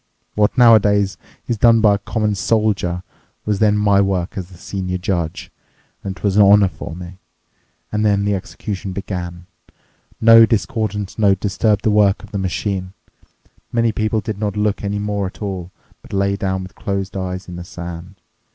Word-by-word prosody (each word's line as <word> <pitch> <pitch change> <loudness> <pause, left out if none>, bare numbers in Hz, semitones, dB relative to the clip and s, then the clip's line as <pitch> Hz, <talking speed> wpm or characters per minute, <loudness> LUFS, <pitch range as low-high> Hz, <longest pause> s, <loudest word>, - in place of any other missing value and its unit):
What 105 -1 +1
nowadays 105 -4 +5 0.3
is 115 -3 -2
done 115 0 +6
by 105 -2 +5
a - - +1
common 105 0 -1
soldier 95 -3 0 0.4
was 105 -2 0
then 105 -1 +3
my 100 -1 +4
work 95 -3 -1
as 95 -2 -5
the 90 - -14
senior 90 0 -4
judge, 90 -3 -3 0.5
and 95 -1 -5
it - - -18
was 100 -1 +1
a - - +7
honour 100 -1 +6
for 80 0 -8
me. 90 +1 -10 0.7
And 105 0 0
then 100 -1 +2
the 100 - +1
execution 100 0 -5
began! 90 -3 -5 0.7
No 115 0 +8
discordant 110 -3 -2
note 100 -3 +3
disturbed 105 +1 +1
the 110 - +4
work 105 -1 +3
of 105 - -13
the 100 - -3
machine. 95 0 -3 0.8
Many 115 -1 +2
people 110 0 -1
did 105 0 -5
not 105 -1 -2
look 105 -1 0
any 100 0 -2
more 100 -1 -2
at 95 - -11
all, 95 -4 -4 0.3
but - - -14
lay 100 0 +1
down 95 -1 -2
with 95 - -11
closed 100 -1 -4
eyes 95 -1 -4
in 90 - -8
the 90 - -7
sand. 85 +1 -9
100 Hz, 180 wpm, -19 LUFS, 95-105 Hz, 0.8 s, No